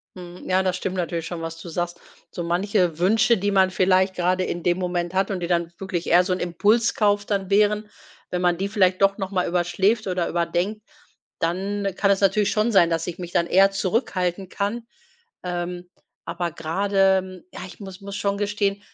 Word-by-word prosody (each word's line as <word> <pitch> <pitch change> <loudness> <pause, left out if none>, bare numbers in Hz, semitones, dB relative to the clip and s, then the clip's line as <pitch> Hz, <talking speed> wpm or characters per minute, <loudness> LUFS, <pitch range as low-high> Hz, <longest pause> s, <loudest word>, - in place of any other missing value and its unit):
Hm. 180 -1 -10
Ja 185 +1 +3
das 185 -1 0
stimmt 185 +1 -3
natürlich 170 -2 -2
schon, 170 -1 -5
was 165 0 -6
du 175 - -9
sagst. 175 +1 -3 0.3
So 175 - -5
manche 180 -1 0
Wünsche, 225 +5 +3
die 205 +2 -1
man 190 -1 +3
vielleicht 185 +1 +2
grade 185 +1 +1
in 175 -1 -4
dem 175 0 +2
Moment 175 -1 -2
hat 195 +2 +1
und 190 - -2
die 170 - -2
dann 170 -1 0
wirklich 185 -3 -4
eher 175 +2 +5
so 185 - -1
'n 180 - -3
Impulskauf 205 +3 +2
dann 200 -2 -2
wären 210 +1 +2 0.4
wenn 180 - -2
man 175 -1 +2
die 195 +3 -1
vielleicht 185 -3 +2
doch 195 +1 +4
noch 195 -1 -4
mal 185 -2 0
überschläft 190 +5 +1
oder 180 -2 -1
überdenkt, 175 +5 -1 0.6
dann 195 +3 -1
kann 200 0 +2
es 195 - +2
natürlich 200 +1 +2
schon 215 +1 +1
sein, 175 -3 +5
dass 165 -1 -1
ich 175 - -6
mich 175 -1 -6
dann 170 -1 +1
eher 195 +2 +5
zurückhalten 190 -2 -1
kann. 210 +4 -3 0.6
Ähm. 175 0 -4 0.4
Aber 175 -2 -3
grade, 190 +2 +1
ja, - - -7
ich 190 - -13
muss 190 -1 -9
muss 200 0 -7
schon 200 0 -1
gestehen, 205 -1 -1
185 Hz, 195 wpm, -23 LUFS, 175-200 Hz, 0.6 s, eher